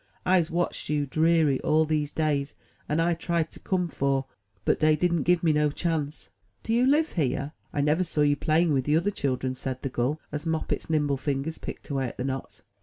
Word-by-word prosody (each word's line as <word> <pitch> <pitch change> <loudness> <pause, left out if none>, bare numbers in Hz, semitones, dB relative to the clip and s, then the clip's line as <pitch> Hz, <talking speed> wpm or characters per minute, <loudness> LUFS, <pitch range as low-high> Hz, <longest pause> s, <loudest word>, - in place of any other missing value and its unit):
Fse 180 -3 +3
watched 175 +1 -2
you, 150 -1 +1
deary, 155 -1 +3
all 160 +1 +3
dese 150 -1 -1
days 145 -2 -1 0.3
and 150 - +1
I 170 +1 +3
tried 165 -1 -1
to - - -12
come 180 -2 0
'fore, 135 -3 0 0.4
but - - +2
dey 155 0 +4
didn't 170 +1 +1
give 175 -1 +4
me 160 -2 +4
no 150 0 +3
chance." 155 -1 -3 0.3
Do 225 - -1
you 245 +2 +4
live 305 +4 +3
here? 140 -2 -1 0.2
I 145 - 0
never 150 +5 +2
saw 155 -4 -1
you 145 0 +4
playing 155 +2 +2
with 130 -2 +1
the 150 +1 +3
other 195 +5 +1
children," 130 -7 -1
said 130 0 -5
the 135 - -1
gull, 130 +5 -1
as 150 0 -4
Moppet's 160 -1 -2
nimble 150 -3 +1
fingers 140 +3 -3
picked - - -8
away 135 -2 0
at - - -9
the - - -2
knots. 135 0 -5
150 Hz, 210 wpm, -27 LUFS, 140-165 Hz, 0.4 s, dey